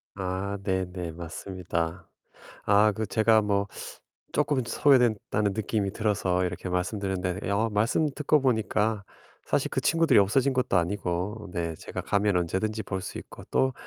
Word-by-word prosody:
아 95 +1 -3
네네 95 -3 -2
맞습니다. 85 0 -4 0.6
아 105 +1 +5
그 110 +1 -3
제가 110 +2 +4
뭐 100 -1 +1 0.7
쪼끔 145 -4 +1
소외된다는 115 -7 +2
느낌이 105 -2 -1
들어서 95 -5 0
이렇게 90 +1 -4
말씀드렸는데 95 0 -2
어 110 +3 +2
말씀 115 +9 +2
듣고 150 +1 +2
보니까 110 -4 +1 0.4
사실 - - +1
그 - - 0
친구들이 165 -8 +4
없어진 125 +8 +3
것도 125 -7 +1
아니고 95 +3 -2
네 85 -2 -2
제가 - - -6
가면 100 -1 +1
언제든지 95 +5 -1
볼 95 0 -3
수 - - -6
있고 - - -11
또 130 0 +2
100 Hz, 305 characters per minute, -27 LUFS, 90-110 Hz, 0.7 s, 아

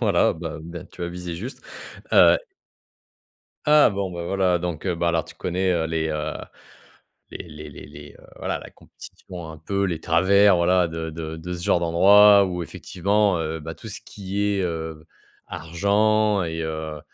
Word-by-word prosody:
voilà - - +3
bah, 80 -1 -6
ben 85 +1 -8
tu 90 - -10
as 85 - -2
visé 90 -1 -6
juste, 115 +10 -7 0.5
heu - - +7 1.3
Ah! 150 -3 +6
Bon, 100 -2 -3
ben, 85 -1 -5
voilà 95 -1 +1
donc, 85 0 -4
heu, 90 - +1
bah, 85 0 0
alors 85 -1 +1
tu - - -13
connais, 90 +1 -1
heu, 85 -2 0
les, 80 -1 -1
heu, 75 0 -3 1.0
les - - -8
les 75 0 -10
les - - -11
les, 75 0 -12
heu, - - -17
voilà - - -3
la - - -11
compétition 85 -3 -11
un 80 - -10
peu, 100 +5 -1
les 85 -4 -3
travers 95 +4 +4
voilà 90 +1 +3
de 80 0 -5
de 80 0 -6
de 85 +3 -7
ce 85 - -7
genre 85 - +2
d'endroit 100 +4 +6
où 90 -1 -3
effectivement, 100 +4 0
heu, 80 0 -3
bah, 80 +1 -7
tout 110 - -11
ce 105 - -6
qui 100 0 -6
est, 100 -1 +1
heu, 80 -2 -4 0.4
argent 100 +4 +1
et 80 0 -4
heu, 80 -1 -5
85 Hz, 180 wpm, -23 LUFS, 80-100 Hz, 1.3 s, heu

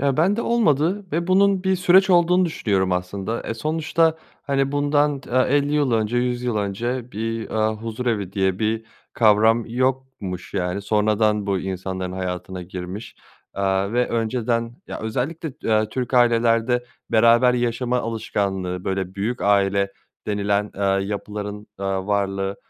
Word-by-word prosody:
Ya, 140 -1 +1
ben 185 +6 +3
de 235 - -1
olmadı 190 - +1
ve 170 +2 0
bunun 195 0 +3
bir 190 0 +2
süreç 185 +2 +5
olduğunu 180 +1 +4
düşünüyorum 100 - 0
aslında. 95 +5 -3
Eee, 115 - -2
sonuçta, 160 +4 +1 0.3
hani, 135 -1 0
bundan 145 0 +1
t - - -14
50 140 +3 +2
yıl 145 -5 +2
önce, 110 +1 +1
100 125 0 0
yıl 120 -3 -1
önce 120 +5 -3
bir, 115 +2 -3
eee, 110 0 +1
huzurevi 110 -3 -3
diye 95 -2 0
bir 110 0 -1 0.3
kavram 110 +1 +4
yokmuş, 125 -7 -3
yani. 90 +1 -1
Sonradan 105 0 +1
bu 100 -1 +1
insanların 95 0 -4
hayatına 90 0 -4
girmiş, 90 +4 -7 0.4
aaa, 100 +1 0
ve 125 0 +1
önceden, 115 +1 -1
ya, - - -6
özellikle, 135 +8 -3
eee, 110 -1 +2
Türk 125 +2 -3
ailelerde 120 0 +3 0.3
beraber 115 +2 +5
yaşama 120 +1 0
alışkanlığı, 100 -5 -2
böyle, 95 -1 -2
"büyük 110 +5 -2
aile" 100 -1 +2 0.3
denilen, 105 0 0
eee, 100 - -5 0.2
yapıların, 105 0 -5
eee, 100 - -5
varlığı, 95 0 -1
115 Hz, 145 wpm, -22 LUFS, 100-130 Hz, 0.4 s, süreç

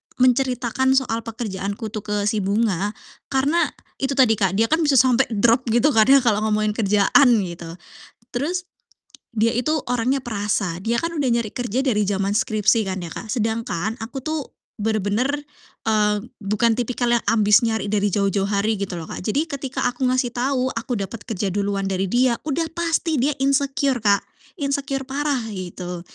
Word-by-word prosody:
menceritakan 255 0 +2
soal 240 -4 +1
pekerjaanku 215 -1 -4
tuh 215 -1 -5
ke 210 0 -3
si 210 +1 +1
Bunga? 205 0 0 0.3
Karena 285 +5 +2 0.3
itu 275 0 -1
tadi, 250 -5 +5
Kak, 195 -1 +1
dia 225 +3 +3
kan 320 - +3
bisa 295 -4 +2
sampai 255 0 +4
drop 235 +3 +2
gitu 240 +6 +3
kan 220 -4 +4
ya, 275 -2 +6
kalau 215 -4 +2
ngomongin 215 0 +1
kerjaan, 210 +5 +4
gitu. 170 -2 -7 0.5
Terus 345 +9 -2 0.7
dia 225 +2 +3
itu 300 +5 0
orangnya 250 +3 0
perasa, 200 -6 -2
dia 225 +4 0
kan 335 +7 -2
udah 290 -5 0
nyari 235 -3 0
kerja 245 +1 -2
dari 210 -7 +1
zaman 195 0 0
skripsi 215 0 +2
kan 190 - -3
ya, 165 - -7
Kak. 225 - -8
Sedangkan 220 -3 -1
aku 240 +4 -6
tuh 310 -3 -3 0.3
bener-bener, 215 +3 0 0.6
eee, 210 -1 +2 0.2
bukan 215 +3 +1
tipikal 245 0 -1
yang - - -26
ambis 210 -1 +5
nyari 220 -3 0
dari 205 0 +1
jauh-jauh 200 0 +1
hari, 210 +2 +1
gitu 195 -3 -3
loh, 165 - -6
Kak. - - -6
Jadi 275 +10 +1
ketika 275 -3 -4
aku 260 +2 -3
ngasih 255 -1 +1
tau 255 +1 0
aku 230 +2 -3
dapet 200 +3 -5
kerja 205 -3 -2
duluan 200 0 -1
dari 190 0 -1
dia, 245 +3 +2
udah 315 +3 0
pasti 330 -3 0
dia 280 +4 +2
insecure, 275 -1 +1
Kak, 205 -2 +3 0.4
insecure 275 -1 -2
parah 285 0 -1
gitu. 180 -2 -6
230 Hz, 170 wpm, -22 LUFS, 205-265 Hz, 0.7 s, ya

